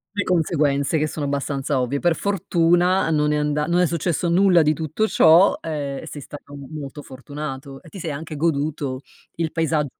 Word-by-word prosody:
Le 205 - 0
conseguenze 155 -4 +1
che 155 - +1
sono 150 -1 -4
abbastanza 140 -1 -1
ovvie. 125 +3 -1
Per 170 0 +2
fortuna 175 -2 +2
non 150 -1 +2
è - - +1
anda 150 0 0
non 175 +2 +2
è - - +4
successo 170 +1 -1
nulla 180 -1 +5
di 155 +1 +3
tutto 160 +7 -1
ciò, 170 0 +5
ehm, 145 -4 -4
e - - -10
sei 145 - -8
stato 145 0 -11
m 140 -1 -9
molto 145 +1 -8
fortunato 135 +1 -8
e 165 - -14
ti 195 - -10
sei 165 -2 -4
anche 155 +2 -6
goduto 145 -3 -1 0.3
il 165 -1 -2
paesa 160 -2 0
155 Hz, 190 wpm, -22 LUFS, 140-170 Hz, 0.3 s, nulla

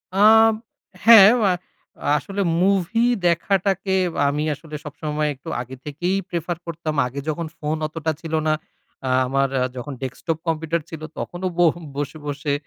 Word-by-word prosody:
আম 220 +2 +7 0.5
হ্যাঁ। 215 -3 +10
ওআ 200 -4 +3 0.7
আসলে 200 +5 -4 0.2
মুভি 200 +4 +2 0.2
দেখাটাকে, 190 +3 +1 0.4
আমি 150 +1 -1
আসলে 155 +1 -10
সবসময়, 150 +1 -2
একটু 130 - -10
আগে 130 +2 -8
থেকেই 175 +6 -1
প্রেফার 170 -1 -3
করতাম। 165 -2 -4
আগে 135 +3 -6
যখন 165 +2 -2
ফোন 155 +1 -2
অতটা 160 0 -2
ছিল 160 -1 -7
না, 155 - +3 0.5
আ - - 0 0.2
আমার 135 +1 +1 0.3
যখন 130 +3 -6
ডেস্কটপ 140 +5 -3
কম্পিউটার 160 +1 0
ছিল, 160 -2 -8 0.2
তখনো 175 +1 -5
বোহ 170 -3 +5 0.2
বসে, 145 +2 -4
বসে 145 0 -2
160 Hz, 140 wpm, -22 LUFS, 150-190 Hz, 0.7 s, হ্যাঁ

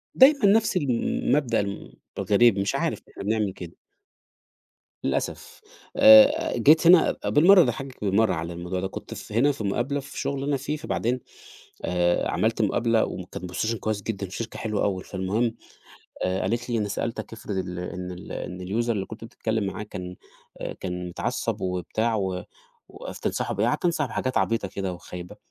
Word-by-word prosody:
دايمًا 270 -3 +6
نفس 210 -1 +4
المبدأ 130 -2 +1 0.6
الغريب 105 0 +4
مش 100 +1 0
عارف - - -1
إحنا - - -8
بنعمل 105 -2 0
كده. 85 -2 -9 1.3
للأسف، - - -3 0.4
آآ، 280 +3 +7
جيت 160 +3 +5
هنا 175 -1 +6
بالمرّة 180 +5 +7
اضحكِك 130 -2 -3
بالمرّة 100 +3 +3
على 85 +1 -4
الموضوع 90 +2 -4
ده 95 - -2
كنت - - -8 0.2
هنا 125 +7 +3
في 130 - -6
مقابلة 120 +8 -1
في 140 0 -8
شغل 140 -1 -2
أنا 145 0 0
فيه 150 +3 -3
فبعدين 125 -4 -1 0.7
آآ، 90 -1 +1
عملت 115 0 +1
مقابلة 115 +2 +2
وكان 90 0 -7
position 115 +5 0
كويّس 110 -1 -2
جدًا 100 -2 -3
في 95 - -8
شركة 115 -1 -5
حلوة 105 -2 -1
أوي 95 -2 -1
فالمهم 105 +5 -1 0.7
آآ، 95 +1 0
قالِت 120 +6 -2
لي: 120 - 0
"أنا 105 - 0
سألتك 115 +3 -4
أفرض 110 -2 -6
ال 90 -1 -4
إن 90 0 -5
ال 90 - -9
إن 90 0 -5
الuser 115 +5 -1
اللي 100 -4 0
كنت 110 +2 -10
بتتكلّم 110 -1 -2
معاه 100 - -4
كان 90 -3 -7 0.5
آآ، - - -4
كان 90 -1 -5
اتعصب - - -3
وبتاع 95 +5 -1
و 95 -3 -2 0.5
وتنصحه - - -4
بإيه؟" - - +1
قعدت - - 0
أنصحه 165 -4 +1
بحاجات 130 +1 -2
عبيطة 115 -3 0
كده 95 -1 -4
وخايبة 90 0 -9
110 Hz, 160 wpm, -25 LUFS, 95-135 Hz, 1.3 s, آآ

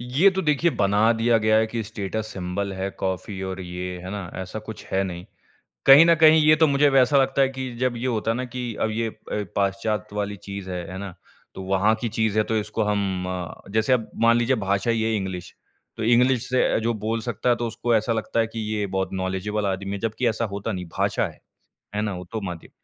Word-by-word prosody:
ये 135 +11 +4
तो 190 0 -2
देखिए 155 +2 +2
बना 105 +3 +4
दिया 115 0 +2
गया 110 0 +3
है 110 0 +3
कि 115 +1 -3
स्टेटस 110 +1 -4
सिंबल 95 +1 -3
है 95 +1 -3
कॉफ़ी 95 +1 -3
और 95 0 -4
ये, 90 0 -5
है 90 +1 -8
ना? 100 -4 -5
ऐसा 95 +3 -5
कुछ 110 0 -9
है 95 +1 +2
नहीं। 90 -1 -6 0.6
कहीं 140 +4 +9
न 170 0 +6
कहीं 160 0 +8
ये 155 - +8
तो 160 0 +4
मुझे 140 +1 +4
वैसा 135 +1 +4
लगता 135 +1 +1
है 135 - +4
कि 130 -1 -5
जब 125 -1 0
ये 125 - -2
होता 115 -2 0
ना 125 +2 -3
कि 125 -2 -5
अब 110 - +1
ये 115 +1 -1
अ, - - -13 0.4
पाश्चात्य 100 +1 -1
वाली 105 0 -2
चीज़ 100 -1 -6
है, 90 -1 -4
है 95 - -6
ना? 100 -2 -6 0.4
तो 95 - -6
वहाँ 95 +3 +2
की 120 - -1
चीज़ 110 -1 0
है 110 - +4
तो 110 - -2
इसको 110 +1 -1
हम 100 -3 -1
अ, 90 0 -6
जैसे 110 +4 +2
अब 115 -3 0
मान 115 0 +6
लीजिए 120 +2 +2
भाषा 100 +4 +1
ही 115 - 0
है 110 0 +1
इंग्लिश। 95 -3 -4 0.4
तो - - -3
इंग्लिश। 125 +2 +3
से 130 - +3
अ, - - +3
जो 115 +1 0
बोल 110 +2 -2
सकता 120 +1 -2
है 120 - +5
तो 120 0 -2
उसको 115 +1 0
ऐसा 110 +2 +1
लगता 115 +1 -2
है 115 - +2
कि 115 0 -7
ये 105 -1 -1
बहुत 95 0 -2
नॉलेजेबल 95 +3 -2
आदमी 95 0 -2
है, 100 - -3
जबकि 115 +3 -1
ऐसा 115 +1 -1
होता 105 +3 -3
नहीं 90 -2 -4
भाषा - - +1
है, - - -14 0.6
है 105 - 0
ना? 105 -2 -1
वो 90 - -7
तो 110 -2 -3
माध्य 90 -3 -6
110 Hz, 240 wpm, -24 LUFS, 95-120 Hz, 0.6 s, कहीं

